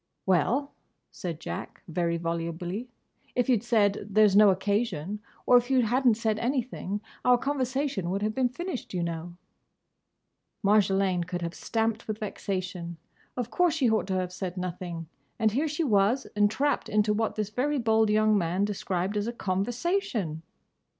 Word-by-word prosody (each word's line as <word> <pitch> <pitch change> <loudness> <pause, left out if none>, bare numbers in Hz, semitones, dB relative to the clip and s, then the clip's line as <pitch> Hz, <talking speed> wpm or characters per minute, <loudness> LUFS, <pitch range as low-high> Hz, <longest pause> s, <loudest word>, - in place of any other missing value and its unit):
"Well," 230 - +2 0.4
said 170 -5 -5
Jack, - - -6
very 170 0 0
volubly, 170 +6 -3 0.5
"if 245 - +2
you'd 245 -6 +3
said, 210 -4 +1
'There's 210 -1 +5
no 210 0 +8
occasion,' 200 -1 0 0.3
or 250 - +7
if 245 +1 0
you 260 -2 +4
hadn't 245 +1 +3
said 220 -1 0
anything, 235 -5 -2 0.2
our 250 0 +5
conversation 265 -7 -1
would 195 +3 -1
have 215 +1 0
been 255 +1 +1
finished, 340 - -5
you 175 - 0
know." 170 +1 -4 1.3
Marjolaine 195 -3 +3
could 175 -1 -3
have 170 0 -3
stamped 225 +1 -1
with 215 -1 -2
vexation. 185 -5 -4 0.4
Of 245 -1 -3
course 355 -3 +2
she 260 -7 +2
ought 220 -3 +1
to 190 - -1
have 180 -1 -2
said 185 -1 -5
nothing. 180 -2 -4 0.3
And 220 -2 +2
here 285 +8 +1
she 305 +3 -1
was 220 +1 +3
entrapped 215 +8 +1
into 210 0 +2
what 220 +1 -1
this 210 -1 -2
very 285 +6 0
bold 220 -3 +3
young 215 0 +4
man 185 +1 +1
described 190 -1 -2
as 205 +1 -1
a - - -1
"conversation"! 220 - -1
210 Hz, 155 wpm, -28 LUFS, 185-245 Hz, 1.3 s, no